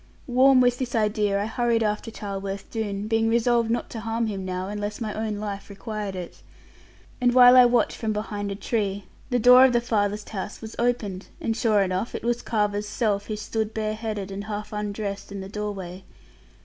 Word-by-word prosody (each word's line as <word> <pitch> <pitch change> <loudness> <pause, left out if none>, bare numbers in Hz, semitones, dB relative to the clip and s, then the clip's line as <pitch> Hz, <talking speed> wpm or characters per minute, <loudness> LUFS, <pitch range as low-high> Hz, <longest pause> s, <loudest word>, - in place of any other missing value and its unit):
Warm 260 +1 +5
with 245 0 +3
this 250 -3 -3
idea, 210 -2 +1
I 205 - -1
hurried 230 0 +1
after 210 +1 -1
Charleworth 195 -2 -6
Doone, 205 -2 -3
being 225 0 +2
resolved 235 0 +2
not 235 - -1
to 225 - -5
harm 230 +1 -1
him 200 -3 -3
now, 185 0 -3
unless 205 +1 -4
my 215 -3 -3
own 215 -1 -3
life 205 -1 -5
required 205 -1 -5
it. 180 -2 -8 0.8
And 245 0 +3
while 250 0 +9
I 250 -1 +9
watched 240 -2 +2
from 220 -2 -2
behind 210 -1 -3
a - - -3
tree, 205 -2 -2 0.3
the 245 - +2
door 250 +2 +8
of 260 -2 +5
the 240 - +4
farthest 210 -3 -1
house 200 0 -5
was 220 -1 -9
opened; 220 -6 -1
and 225 - -1
sure 220 -4 +3
enough 185 +4 -2
it - - -5
was 240 0 0
Carver's 210 -1 -1
self, 205 -2 -1
who 215 - -3
stood 220 +1 -3
bareheaded, 215 -2 -3
and 200 +1 -5
half 210 0 -5
undressed 205 -1 -4
in 200 - -5
the 190 - -6
doorway. 195 -3 -5
215 Hz, 195 wpm, -25 LUFS, 200-230 Hz, 0.8 s, while